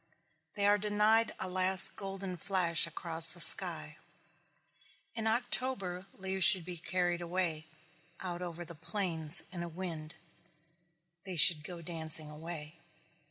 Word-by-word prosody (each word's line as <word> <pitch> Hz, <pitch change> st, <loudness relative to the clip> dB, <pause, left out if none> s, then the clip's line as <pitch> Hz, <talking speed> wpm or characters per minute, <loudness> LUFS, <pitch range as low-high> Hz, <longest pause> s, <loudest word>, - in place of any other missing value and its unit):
They 200 Hz, -, -4 dB
are 205 Hz, 0 st, 0 dB
denied 215 Hz, +2 st, -3 dB
a 190 Hz, -, -7 dB
last 185 Hz, +1 st, +2 dB
golden 195 Hz, -1 st, -9 dB
flash 170 Hz, -2 st, -3 dB
across 165 Hz, 0 st, 0 dB
the 175 Hz, -, -9 dB
sky. -, -, +7 dB, 1.2 s
In 225 Hz, -1 st, -7 dB
October 220 Hz, -5 st, -4 dB
leaves 190 Hz, 0 st, -6 dB
should 180 Hz, 0 st, +5 dB
be 180 Hz, -1 st, -11 dB
carried 175 Hz, +1 st, -6 dB
away, 170 Hz, -3 st, -7 dB, 0.5 s
out 180 Hz, -1 st, -10 dB
over 175 Hz, -1 st, -10 dB
the 170 Hz, -, -13 dB
plains, 165 Hz, -1 st, +2 dB
in 175 Hz, -2 st, -9 dB
a 170 Hz, -, -9 dB
wind. 165 Hz, -3 st, -11 dB, 1.1 s
They 190 Hz, -2 st, -11 dB
should 160 Hz, -2 st, +3 dB
go 170 Hz, +1 st, -12 dB
dancing 160 Hz, -2 st, -1 dB
away. 155 Hz, 0 st, -12 dB
175 Hz, 130 wpm, -27 LUFS, 165-190 Hz, 1.2 s, sky